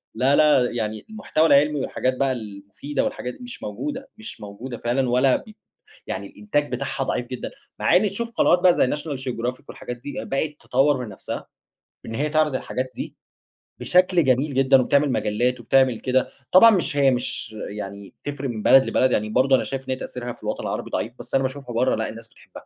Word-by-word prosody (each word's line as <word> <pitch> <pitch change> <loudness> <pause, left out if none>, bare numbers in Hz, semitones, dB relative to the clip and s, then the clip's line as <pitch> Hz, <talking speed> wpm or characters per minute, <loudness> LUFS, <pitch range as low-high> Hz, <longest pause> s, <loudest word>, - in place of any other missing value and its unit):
لا 135 +3 +3
لا 150 -5 +4
يعني 110 -2 -3
المحتوى 205 -7 0
العلمي 145 +1 +4
والحاجات 130 0 -1
بقى 135 0 +1
المفيدة 105 +5 -5
والحاجات 125 - -3
دي - - -13
مش 245 0 -8
موجودة، 275 -2 -5
مش 220 0 -9
موجودة 110 +5 -7
فعلًا 125 +2 0
ولا 130 +2 +4
ب - - -12 0.6
يعني 100 +1 -4
الإنتاج 115 +10 -2
بتاعها 135 +1 -2
ضعيف 125 -2 -2
جدًا، 125 0 -6 0.3
مع - - +3
إن 185 - +5
تشوف 230 +4 -4
قنوات 180 -5 +3
بقى 180 -1 +5
زي - - +3
National 145 -3 -5
Geographic 125 0 -3
والحاجات 125 0 -7
دي 145 +4 -8
بقت 150 +2 -2
تطور 135 0 +2
من 110 - -9
نَفسها 95 - -7 0.6
إن 115 - -6
هي 145 +6 0
تعرض 155 -2 +2
الحاجات 130 0 -4
دي - - -6 0.6
بشكل 180 -1 +3
جميل 135 +3 +2
جدًا، 135 0 +5
وبتعمل 140 +2 +2
مجلات 120 +4 0
وبتعمل 130 -1 +3
كده، 130 0 +1 0.2
طبعًا 225 +5 +9
مش 175 -7 +1
هي 135 -2 +5
مش 120 -3 -3
يعني 100 -1 -8
تفرق 140 -2 -4
من 110 -3 -5
بلد 135 0 +7
لبلد 130 0 +2
يعني 105 +1 0
برضو 130 +4 +4
أنا - - +1
شايف 135 -1 -4
إن - - -2
هي 130 - +1
تأثيرها 120 -2 -6
في - - -21
الوطن - - -3
العربي - - -4
ضعيف، 115 - -2
بس - - -11
أنا 135 - +3
باشوفها 130 -2 -5
برّا 125 +3 +2
لأ 110 - -2
الناس 115 0 -10
بتحبها، - - -15
130 Hz, 200 wpm, -23 LUFS, 120-145 Hz, 0.6 s, طبعًا